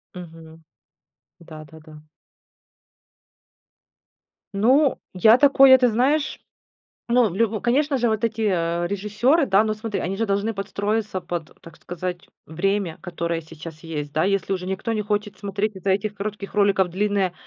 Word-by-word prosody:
Мгм. 165 -2 -12 0.8
Да-да-да. 155 -1 -13 2.5
Ну, 260 +8 +3
я 220 +6 +5
такое, 270 -1 +7
ты 250 -1 +3
знаешь, 275 +7 0 0.7
ну, 235 -2 +3
в - - -8
лю 220 +1 0
конечно 275 +4 +1
же, 240 -1 +1
вот 220 0 -1
эти, 225 0 -1
э, 170 -4 0
режиссёры, 210 - +1
да? 195 0 +3
Ну, 215 - -1
смотри, 215 -1 -4
они 190 +3 -3
же 225 +2 -1
должны 200 +2 -1
подстроиться 205 0 -3
под, 170 -2 -6
так 165 -2 -14
сказать, 180 0 -6 0.2
время, 190 +1 -2
которое 170 -2 -3
сейчас 160 0 -11
есть, 150 -3 -6
да? 155 +1 +1
Если 195 0 0
уже 185 -1 -3
никто 190 +5 -3
не 215 -1 -1
хочет 210 0 -3
смотреть 200 +1 -3
из-за 190 +1 -2
этих 200 +2 -1
коротких 205 0 -6
роликов 200 -2 +3
длинные 200 0 0
200 Hz, 145 wpm, -22 LUFS, 175-220 Hz, 2.5 s, такое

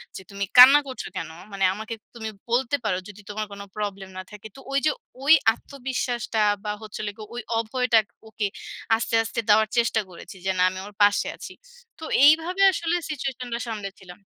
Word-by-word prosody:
যে - - -7
তুমি 200 0 -4
কান্না 265 +4 +11
করছো 260 - -6
কেন? - - -4 0.2
মানে 195 -1 -3
আমাকে 220 +3 -6 0.2
তুমি 220 -1 -5 0.2
বলতে 245 +3 +1
পারো 210 -4 0
যদি 205 0 -12
তোমার 215 +1 -3
কোন 200 0 -8
প্রবলেম 200 -2 -4
না 185 - -4
থাকে।" 210 0 -10
তো - - -12
ওইযে 280 +3 +2 0.3
ঐ - - -7 0.3
আত্মবিশ্বাসটা 250 -4 -4 0.2
বা, 210 - -4
হচ্ছে 215 - -8
হল 210 - -3
গিয়ে 215 -1 -9
ওই 240 - -4 0.2
অভয়টা 245 +1 +1 0.3
ওকে 215 -1 -2 0.5
আস্তে, 230 +1 -4
আস্তে 225 - -4
দেওয়ার 215 +1 +5
চেষ্টা 230 -1 +2
করেছি 180 +2 -12
যে, 190 - 0
না, - - +1
আমি 185 0 -7
ওর 205 - -11
পাশে 205 0 +3
আছি। - - -9 0.5
তো - - -10 0.2
এইভাবে 325 +6 +5
আসলে 340 -1 -1
সিচুয়েশনটা 250 -4 -4
সামনে 210 -3 -4
ছিলাম। 180 -2 -13
220 Hz, 185 wpm, -24 LUFS, 205-255 Hz, 0.5 s, কান্না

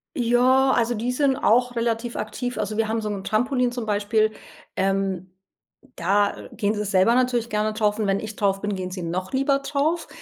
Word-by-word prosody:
Ja, 255 +2 +3
also, 240 -1 +1
die 235 +3 -2
sind 270 +1 +2
auch 245 +2 +2
relativ 230 0 -1
aktiv, 245 +3 -4
also 215 0 -3
wir 225 -1 +1
haben 225 +1 -1
so 215 - -3
'n 200 -2 -4
Trampolin 250 +4 +1
zum 245 -2 -4
Beispiel, 215 +1 +1 0.4
ähm, 195 -1 -1 0.6
da, 200 +4 +1 0.2
gehen 210 -2 -1
sie 210 -1 -2
selber 200 +3 +3
natürlich 245 -2 +1
gerne 215 0 0
drauf 210 -1 0
und 215 -2 -1
wenn 195 0 +1
ich 215 -1 -7
drauf 195 -2 +1
bin, 205 -1 -2
gehen 185 -1 -5
sie 185 -1 -5
noch 180 +3 -3
lieber 275 +1 +2
drauf. 300 +4 -1
220 Hz, 195 wpm, -23 LUFS, 205-245 Hz, 0.6 s, Ja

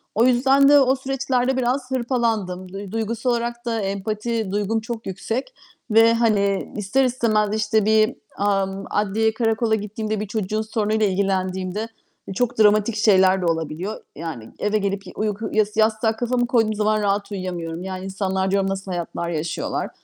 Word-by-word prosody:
O 230 +3 +4
yüzden 270 +3 +5
de 290 0 +8
o 265 0 +4
süreçlerde 265 -1 -1
biraz 255 +1 -1
hırpalandım. 225 -8 -1
Duy 195 -1 -7
duygusal 225 +2 -2
olarak 235 0 -2
da 230 -1 -1
empati 215 +2 -2
duygum 210 +2 0
çok 230 0 -6
yüksek 230 - -4 0.4
ve, 225 +1 +6
hani, 205 -4 +1
ister 210 +7 +1
istemez, 215 -4 +1
işte, 215 -1 +1
bir, 215 0 +4 0.3
ımm, 195 -1 0
adliyeye, 215 +2 +1
karakola 225 -1 +1
gittiğimde, 215 0 -3
bir 210 - -4
çocuğun 215 0 -2
sorunuyla 220 -1 0
ilgilendiğimde 190 +1 -1 0.5
çok 245 0 -1
dramatik 210 +1 +4
şeyler 190 -3 +4
de - - -1
olabiliyor. 165 +4 -2
Yani, 155 -9 -6
eve 210 +1 +1
gelip 200 -1 -2
ya - - -10
uyku 215 0 -2
yas 215 0 +1
yastığa 220 0 +2
kafamı 245 +1 0
koyduğum 225 -3 +2
zaman 215 0 +1
rahat 200 0 0
uyuyamıyorum. 175 -3 -4
Yani, 190 0 -5
insanlar 190 0 -1
diyorum 195 -1 +1
nasıl 195 -1 -4
hayatlar 170 0 -3
yaşıyorlar. 160 0 -3
215 Hz, 155 wpm, -22 LUFS, 195-230 Hz, 0.5 s, de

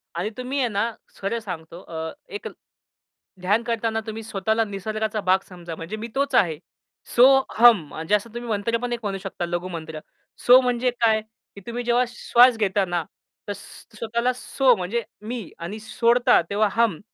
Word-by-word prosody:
आणि 180 +5 -1
तुम्ही 260 +3 -3
आहे 250 - +2
ना 220 +2 -1 0.3
खरं 230 +4 -1
सांगतो, 170 -4 -8
अ, 160 -1 -6 0.2
एक 415 - -5 0.9
ध्यान 205 +5 +2
करतांना 225 -1 -1
तुम्ही 220 +1 -5
स्वतःला 220 +1 0
निसर्गाचा 215 +1 -3
भाग 190 0 +3
समजा 175 -3 -8
म्हणजे 165 +7 -6
मी 225 +2 -5
तोच 280 +1 0
आहे. 165 -7 +3 0.6
सो 240 - +7 0.3
हम 235 -1 +8
म्हणजे 165 +8 0
असं 220 +2 -3
तुम्ही 240 0 -6
मंत्र 220 +2 0
पण 245 -1 -2
एक 235 - -3
म्हणू 195 -1 -2
शकता 185 -2 -4
लघु 175 +1 -3
मंत्र. 160 -3 -6 0.4
सो 250 +1 +7
म्हणजे 250 0 +1
काय? 220 -1 +4 0.3
की 200 - -10
तुम्ही 240 +1 -3
जेव्हा 240 +1 +3
श्वास 245 0 +4
घेता 200 -2 +1
ना 175 -2 -1 0.4
तर 205 - -2
स्वतःला 230 +4 -3
सो 250 0 +2
म्हणजे 205 +5 -2 0.2
मी 235 -7 -5
आणि 195 +6 -6
सोडता 235 +1 +3
तेव्हा 210 +1 +2
हम 230 -8 +1
220 Hz, 170 wpm, -24 LUFS, 190-235 Hz, 0.9 s, हम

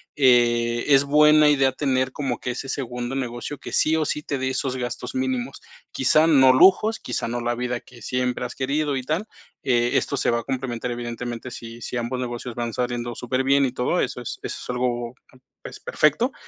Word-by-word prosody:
eh, 120 -3 +3
es 140 -2 +5
buena 150 +1 +5
idea 135 -2 +3
tener 130 -1 0
como 130 -3 -3
que 125 - -3
ese 130 +2 -6
segundo 125 -1 -4
negocio 125 +2 -4
que - - -9
sí 155 - +3
o 160 -1 +1
sí 150 - -2
te 145 -1 -3
dé 130 0 -1
esos 130 0 -2
gastos 120 -1 -5
mínimos. 130 0 -2 0.3
Quizá 155 +4 +3
no 135 -5 +6
lujos, 195 +10 +5
quizá - - -4
no 120 +1 -2
la 120 0 -1
vida 125 0 -2
que 120 0 -17
siempre 125 +2 -1
has 125 - -6
querido 140 +2 -1
y 130 - -4
tal, 160 +11 -2 0.4
eh, 120 -1 +2
esto 140 - 0
se - - +1
va 120 - +1
a - - -15
complementar 125 -2 -3
evidentemente 120 0 -5
sí 115 -1 -9
sí 125 - -5
ambos 120 +1 -2
negocios 120 -1 -5
van 120 0 -4
saliendo 120 -1 -3
superbién 130 +3 +1
y 130 - -1
todo 125 0 0
eso. - - -3
Es - - -6
eso - - -4
es - - -11
algo 125 -1 -2 0.5
es - - -8
perfecto, - - +1
125 Hz, 200 wpm, -23 LUFS, 120-135 Hz, 0.5 s, no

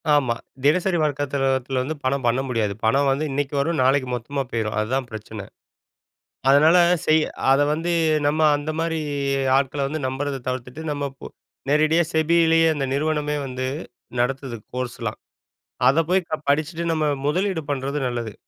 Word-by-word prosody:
ஆமா. 125 -5 +2 0.3
தினசரி 175 +5 +3
வர்க்கத்தத்தில 140 -2 0 0.2
தில 130 -1 -1
வந்து 155 +4 -4
பணம் 130 0 0
பண்ண 120 +2 +2
முடியாது. 110 -5 0
பணம் 135 +5 +3
வந்து 145 +3 0
இன்னைக்கு 145 +1 -2
வரும், 160 +2 0
நாளைக்கு 130 0 +2
மொத்தமா 135 +4 -3
போயிரும், 110 -2 -2
அதுதான் 125 +4 -1
பிரச்சனை. 110 -1 -7 1.1
அதனால 155 +5 +6 0.3
செய் 155 0 +4 0.3
அதை 140 +2 +4
வந்து 165 +3 -1 0.3
நம்ம 150 +2 +1 0.2
அந்த 145 +2 -4
மாரி 165 -1 -1 0.6
ஆட்களை 140 +1 0
வந்து 155 +2 -4
நம்புறத 135 +1 -3
தவிர்த்துட்டு, 130 +4 -5
நம்ம 145 -1 -2
இப்போ 135 - -10 0.4
நேரடியா 155 +3 +3
SEBIலேயே 165 0 +4
அந்த 140 - -2
நிறுவனமே 150 0 0
வந்து 130 0 -4 0.5
நடத்துது 130 -1 -1 0.2
கோர்ஸ்லாம். 125 -1 -4 0.7
அதை 145 +5 +5
போய் 185 -1 +2
க - - -5 0.2
படிச்சிட்டு, 155 +4 0
நம்ம 155 -1 0 0.2
முதலீடு 185 +2 0
பண்ணுறது 140 +1 -2
நல்லது. 120 -3 -4
145 Hz, 145 wpm, -23 LUFS, 130-155 Hz, 1.1 s, அதனால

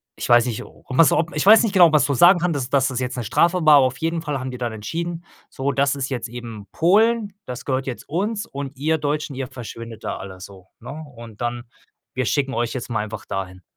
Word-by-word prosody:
ich - - -5
weiß 120 0 +6
nicht, 120 -4 -3
um - - -18
was 165 - +6
ob 165 0 0
ich 150 - 0
weiß 220 +3 +8
nicht 220 -4 -1
genau 175 -4 +7
was 150 -3 +4
du 140 - 0
sagen 175 +8 +7
kann, 175 0 0
dass 135 -3 -3
das 135 -1 +2
jetzt 125 0 -3
'ne 120 - -2
Strafe 170 - +2
war, 150 -1 +8
auf 130 -1 +1
jeden 165 +1 -1
Fall 150 -4 -3
haben 130 0 -5
die 125 - -8
dann 120 -2 -3
entschieden: 165 +10 -5 0.2
„So, 135 +1 -2
das 140 +1 +1
ist 135 -1 -3
jetzt 125 -3 -3
eben 115 -4 -8
Polen. 210 +4 +2
Das 125 -1 -7
gehört 130 -1 -1
jetzt 125 - -6
uns 205 +7 -2
und 140 0 -6
ihr 160 +4 +1
Deutschen, 145 -1 -2
ihr 130 0 -4
verschwindet 115 -3 -9
da - - -3
alle 95 -1 -9
so, 95 -1 -12
ne?“ 150 +5 -8
Und 115 -2 -12
dann: 120 0 -3 0.5
„Wir 130 0 0
schicken 135 +2 0
euch 120 0 -1
jetzt 125 -2 -5
mal 115 -3 -1
einfach 110 0 -7
dahin.“ 95 -1 -5
135 Hz, 240 wpm, -22 LUFS, 120-160 Hz, 0.5 s, weiß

